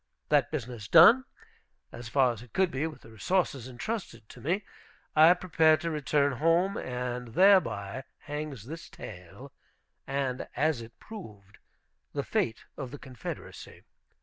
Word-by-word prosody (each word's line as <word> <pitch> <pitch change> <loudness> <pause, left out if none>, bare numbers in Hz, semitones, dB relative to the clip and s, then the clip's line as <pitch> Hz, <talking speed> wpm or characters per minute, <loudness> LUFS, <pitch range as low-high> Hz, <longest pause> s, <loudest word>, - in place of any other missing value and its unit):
That 145 -5 +3
business 120 -7 -5
done, 200 - +8 0.7
as 120 -1 -8
far 130 -1 +3
as 110 - -11
it 120 -2 -15
could 190 -3 +2
be 140 +4 -1
with 160 - -10
the 115 - -15
resources 135 - -1
intrusted 125 - -5
to - - -13
me, 180 +8 0 0.5
I 160 +2 +8
prepared 160 -3 +3
to 170 - -2
return 145 -2 +1
home. 170 +5 +3
And 125 -2 -4
thereby 155 - +3
hangs 145 -6 -6
this 160 +5 -8
tale, 90 +10 -11 0.5
and, 135 -2 -2
as 150 -4 +1
it 115 0 -12
proved, 105 - -11 0.5
the - - -2
fate 115 -1 -1
of 135 -4 -5
the 145 - -8
Confederacy. 130 -3 -9
140 Hz, 145 wpm, -29 LUFS, 120-165 Hz, 0.7 s, done